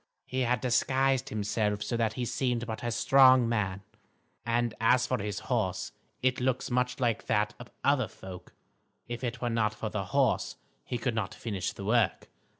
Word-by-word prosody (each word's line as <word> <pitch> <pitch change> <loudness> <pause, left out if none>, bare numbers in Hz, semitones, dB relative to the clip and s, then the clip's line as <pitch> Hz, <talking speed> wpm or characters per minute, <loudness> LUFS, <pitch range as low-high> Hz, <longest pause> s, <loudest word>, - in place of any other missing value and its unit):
He 130 - -3
had 125 -1 +1
disguised 135 +1 +2
himself 105 -2 -1
so 110 - -2
that 115 -2 +1
he 125 +2 -3
seemed 120 -1 -1
but 110 -1 -5
a 120 - -1
strong 130 0 +6
man. 100 -4 -1 0.6
And 120 -1 0
as 125 +2 +4
for 125 -3 -1
his 105 -1 -3
horse - - -1 0.3
it 130 -1 +2
looks 130 0 0
much 125 +1 0
like 115 -3 0
that 105 -2 +1
of - - -10
other - - +3
folk. 90 -1 -11 0.5
If 120 +1 -5
it 120 0 -3
were 120 - 0
not 110 -2 +1
for 110 0 -4
the 100 -2 -2
horse, - - +1 0.3
he 120 - -2
could 120 +1 -1
not 110 -4 -3
finish 100 -6 -3
the 100 - -8
work. 110 -2 +1
115 Hz, 180 wpm, -29 LUFS, 105-125 Hz, 0.6 s, strong